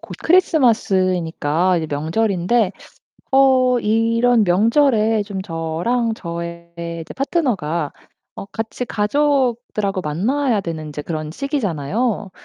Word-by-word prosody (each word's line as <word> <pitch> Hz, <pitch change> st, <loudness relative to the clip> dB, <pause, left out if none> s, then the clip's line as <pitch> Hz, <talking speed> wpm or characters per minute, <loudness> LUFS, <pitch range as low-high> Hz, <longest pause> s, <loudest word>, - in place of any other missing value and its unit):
곧 -, -, -9 dB
크리스마스이니까 185 Hz, -, +2 dB
이제 160 Hz, -, -3 dB
명절인데 185 Hz, +7 st, +1 dB, 0.6 s
어 260 Hz, -2 st, +4 dB
이런 230 Hz, +1 st, +2 dB
명절에 220 Hz, +2 st, +3 dB
좀 200 Hz, -2 st, -5 dB
저랑 175 Hz, +8 st, -1 dB
저의 170 Hz, -2 st, -7 dB, 0.3 s
제 -, -, -9 dB
파트너가 200 Hz, -, -1 dB, 0.4 s
어 -, -, -7 dB
같이 225 Hz, +4 st, -5 dB
가족들하고 240 Hz, -4 st, 0 dB
만나야 215 Hz, -, 0 dB
되는 165 Hz, -3 st, -5 dB
인제 150 Hz, 0 st, -6 dB
그런 155 Hz, -1 st, -5 dB
시기잖아요. 215 Hz, -, -2 dB
210 Hz, 255 characters per minute, -20 LUFS, 170-245 Hz, 0.6 s, 어